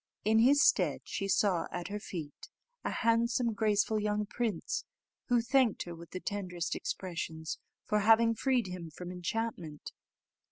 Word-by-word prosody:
In 220 +1 +4
his 275 +5 +6
stead - - +3
she 195 - -3
saw 195 -3 +2
at 175 0 -4
her 205 +1 -3
feet 160 -7 -7 0.3
a - - -1
handsome, 230 +1 +2
graceful 215 0 +2
young 210 0 0
prince, 215 -4 -2 0.4
who 245 -2 +3
thanked 250 -2 +3
her 175 - -7
with 170 0 -11
the 185 - -5
tenderest 180 -4 -3
expressions 160 -3 -4 0.3
for 210 - +2
having 225 +2 +5
freed 255 0 +1
him 180 -3 -6
from 175 +3 -8
enchantment. 180 -4 -4
205 Hz, 150 wpm, -32 LUFS, 175-230 Hz, 0.4 s, his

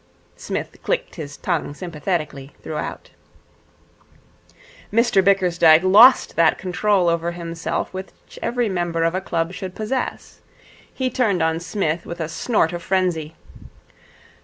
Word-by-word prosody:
Psmith - - -6
clicked - - -2
his 145 -4 -8
tongue 165 -5 -2
sympathetically 155 -5 -4
throughout. 155 -1 -6 1.8
Mr 220 -3 +3
Bickersdyke 175 -4 +4
lost 220 +8 +6
that 165 -1 +4
control 190 0 +1
over 170 0 0
himself 170 0 -4
which 190 +1 -10
every 245 -1 0
member 175 -3 -1
of 165 +1 +1
a 185 - -1
club 170 -2 -2
should 185 -1 -7
possess. 235 +4 -4 0.5
He 260 -1 -2
turned 205 -9 +1
on 160 0 +1
Psmith 170 -1 -2
with 170 - -7
a 160 -1 -3
snort 165 0 0
of 175 - -4
frenzy. 170 -4 -1
175 Hz, 125 wpm, -21 LUFS, 165-195 Hz, 1.8 s, lost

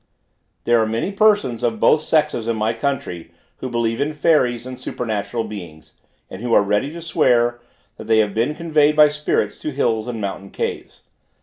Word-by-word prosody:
There 120 -1 +3
are 110 - +1
many 115 - -2
persons 205 - +2
of 115 -2 -1
both 150 - +4
sexes 150 -8 0
in 115 - 0
my 110 +2 0
country, 130 - -3 0.3
who 130 - -5
believe 115 0 -1
in 150 +2 -1
fairies 130 -6 +2
and 130 0 -8
supernatural 115 0 -3
beings, 85 -8 -10 0.3
and 95 - -9
who 120 -1 +1
are - - +5
ready 105 +8 0
to 170 0 -8
swear, 120 -6 +2 0.4
that - - -9
they 110 0 +4
have 105 -2 +2
been 120 +7 0
conveyed 155 -3 +2
by 150 -1 +7
spirits 150 0 -1
to - - -4
hills 115 -5 -1
and 120 -2 -4
mountain 100 -1 -5
caves. - - -5
120 Hz, 185 wpm, -20 LUFS, 110-150 Hz, 0.4 s, by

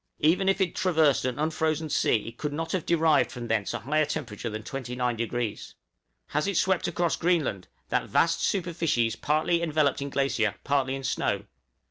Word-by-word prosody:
Even 180 +5 +3
if 195 - +2
it 185 -3 +1
traversed 160 -8 +2
an 125 -1 -1
unfrozen 160 +1 0
sea 115 -7 +1
it 115 - -16
could 150 - -2
not 165 +2 -3
have 185 -4 -2
derived 160 -3 +3
from 120 -2 -6
thence 110 -3 0
a - - -2
higher 155 +4 +1
temperature 120 -6 -4
than 110 0 -6
29°. 120 -3 -3 0.6
Has 150 +5 0
it 200 -3 0
swept 190 -2 +2
across 175 -1 0
Greenland 155 - 0 0.2
that - - 0
vast - - +2
superficies 165 - 0
partly 155 +6 +1
enveloped 155 -4 +1
in 140 - -3
glacier, 135 -7 0
partly 135 -1 +1
in 135 - -6
snow? - - -1
150 Hz, 170 wpm, -27 LUFS, 125-165 Hz, 0.6 s, Even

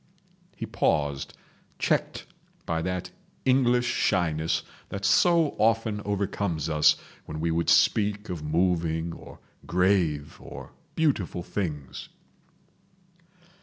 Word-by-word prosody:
." - - -34
He - - -4
paused, 70 -2 0 0.4
checked - - 0 0.4
by 80 -1 -1
that 90 +1 -3 0.3
English 125 -2 +3
shyness 85 -9 +1 0.3
that 100 0 -4
so 165 - +4
often 110 -1 +2
overcomes 100 -5 -2
us 75 -1 +5 0.3
when 75 - -5
we 85 +1 0
would 85 +1 0
speak 105 0 +3
of 90 -4 -5
moving 80 +1 0
or - - -12 0.3
grave 85 -5 +1
or - - -10 0.2
beautiful 115 - 0
things. 75 -10 -5
90 Hz, 105 wpm, -27 LUFS, 80-105 Hz, 0.4 s, us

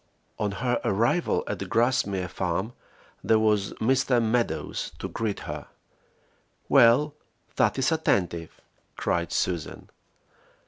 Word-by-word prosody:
On 105 -1 -1
her 120 +3 -1
arrival 115 - +1
at - - -4
Grassmere 100 -6 +1
Farm 95 +5 -2 0.5
there 110 - +4
was 105 -2 +1
Mr. 130 +1 +2
Meadows 115 +1 -1
to - - -5
greet 110 -3 -3
her. - - -6 1.0
"Well, 135 +3 +5 0.4
that 125 -3 +2
is 135 +3 +1
attentive!" 90 - 0 0.4
cried 85 0 -1
Susan. 85 -4 -3
110 Hz, 105 wpm, -26 LUFS, 95-125 Hz, 1.0 s, Well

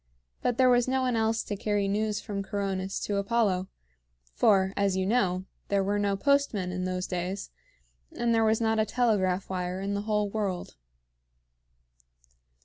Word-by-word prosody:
But 245 -1 0
there 260 - +5
was 245 0 +3
no 260 0 +1
one 250 -2 +1
else 225 0 +1
to 205 - -4
carry 205 0 0
news 210 +1 0
from 200 -1 -4
Coronis 195 -1 -3
to 205 - -1
Apollo; 200 -3 +1 0.7
for, 190 - +3
as 200 -2 +1
you 190 - 0
know, 190 -4 +1 0.2
there 200 -1 +1
were 205 +1 0
no 200 -1 +1
postmen 235 -7 +1
in 180 0 -3
those 185 0 -2
days, 180 +2 -4 0.6
and 235 -1 0
there 225 0 +3
was 220 0 +3
not 225 -1 +1
a 215 - +3
telegraph 200 -6 +1
wire 180 0 -3
in 200 +1 -2
the 200 - -1
whole 210 -1 0
world. 200 - -3
200 Hz, 165 wpm, -28 LUFS, 190-220 Hz, 0.7 s, there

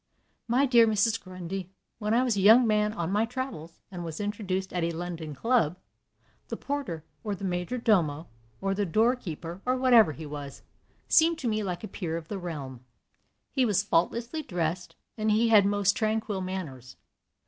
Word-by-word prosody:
"My 250 +4 +3
dear 235 -3 +6
Mrs. 220 +1 +2
Grundy, 185 0 -6 0.3
when 210 -1 -2
I 240 +3 +4
was 245 -4 +1
a 200 - 0
young 225 +5 +7
man 210 -1 +2
on 175 -4 -3
my 210 +2 +2
travels, 225 - -6
and 175 -2 -6
was 160 -2 -6
introduced 200 -2 -3
at 180 -2 -1
a 165 - +1
London 165 -2 -5
club, 200 - +1 0.7
the - - -5
porter, 275 - -4 0.2
or 210 -2 -2
the 195 - -10
major 180 +5 -2
domo, 170 -9 +1 0.3
or 195 0 0
the 205 +1 0
door 225 +8 +3
keeper, 170 -4 -7
or 255 +1 +1
whatever 240 -9 +5
he 155 +3 -8
was, 145 -2 -8 0.4
seemed 330 0 +4
to 265 - -3
me 215 -1 0
like 180 -2 -4
a - - -4
peer 165 -6 -4
of 165 -1 -9
the 205 - -4
realm. 140 -8 -6 0.7
He 265 - +1
was 205 -4 +2
faultlessly 235 - 0
dressed, 175 - -3 0.2
and 215 0 +1
he 225 +2 +3
had 205 -3 +6
most 205 -1 +2
tranquil 215 -2 -1
manners. 145 -10 -6
195 Hz, 180 wpm, -28 LUFS, 170-225 Hz, 0.7 s, young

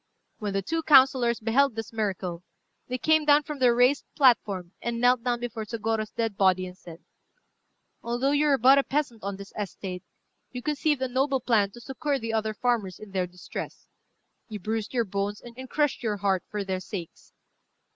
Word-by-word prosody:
When 205 -3 -3
the 195 0 -1
two 325 - -1
councillors 260 -5 +5
beheld 235 +3 +2
this 225 0 -6
miracle, 185 -5 -3 0.4
they 255 - -2
came 315 +3 +3
down 295 0 +5
from 295 -1 -6
their 245 -2 +4
raised 250 +4 +4
platform, 205 - +3
and 235 -1 -2
knelt 245 0 +3
down 245 -1 0
before 235 -2 -4
Sôgorô's 220 0 -2
dead 225 -2 -2
body 185 -1 +3
and 180 0 -9
said 170 -2 -13 1.0
"Although 240 +4 0
you 290 +1 +3
were 280 -2 +4
but 265 +3 +6
a - - +2
peasant 270 -7 -2
on 200 0 -3
this 195 0 -11
estate, 190 -3 -5 0.5
you 250 -1 -6
conceived 295 -2 0
a - - +1
noble 265 +2 +1
plan 225 -5 +2
to 220 - -13
succour 280 +3 -2
the 230 -3 -4
other 220 -1 -1
farmers 220 -6 -1
in 215 -2 -12
their 185 -2 -1
distress. 180 0 -8 0.6
You 215 - -5
bruised 215 +2 -3
your 240 -3 +1
bones, 200 +1 -3
and 245 +2 -10
crushed 295 -2 0
your 215 -3 -1
heart, 195 -2 +1
for 210 -1 -3
their 190 -1 -2
sakes. 180 -2 -8
230 Hz, 185 wpm, -27 LUFS, 200-260 Hz, 1.0 s, but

